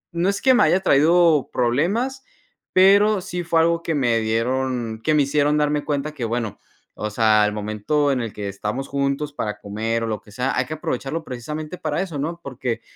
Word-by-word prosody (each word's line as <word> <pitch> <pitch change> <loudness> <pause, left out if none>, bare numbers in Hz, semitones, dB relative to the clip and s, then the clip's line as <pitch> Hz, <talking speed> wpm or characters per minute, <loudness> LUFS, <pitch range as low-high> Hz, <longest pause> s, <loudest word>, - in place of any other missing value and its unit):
no 175 +3 +1
es 200 - -2
que 260 - +6
me 245 - +4
haya 170 +4 +4
traído 160 -1 +4
problemas, 195 - 0 0.5
pero 200 +2 +5
sí, 180 -1 -5
fue 165 -1 +2
algo 170 +1 +2
que 165 -1 -2
me 120 -5 +2
dieron 115 0 -1
que 155 - +2
me 150 - +4
hicieron 145 +1 +1
darme 150 0 +1
cuenta 145 0 -2
que, 135 - -6
bueno, 115 -2 -3 0.3
o 105 - -4
sea, 110 -1 +3
el - - -1
momento 110 +8 0
en 130 -2 0
el 115 -2 -4
que 100 -1 -6
estamos 105 +7 -4
juntos 140 +1 -2
para 105 -7 -3
comer 110 +3 -3
o - - -2
lo 110 -2 -3
que - - -19
sea, 125 +5 -2
hay 125 - +1
que 155 - -4
aprovecharlo 150 +2 -3
precisamente, 150 +6 -6
para 155 0 -2
eso, 165 -7 -6
¿no?, 165 +4 -3
porque 125 -3 -4
140 Hz, 205 wpm, -22 LUFS, 115-160 Hz, 0.5 s, que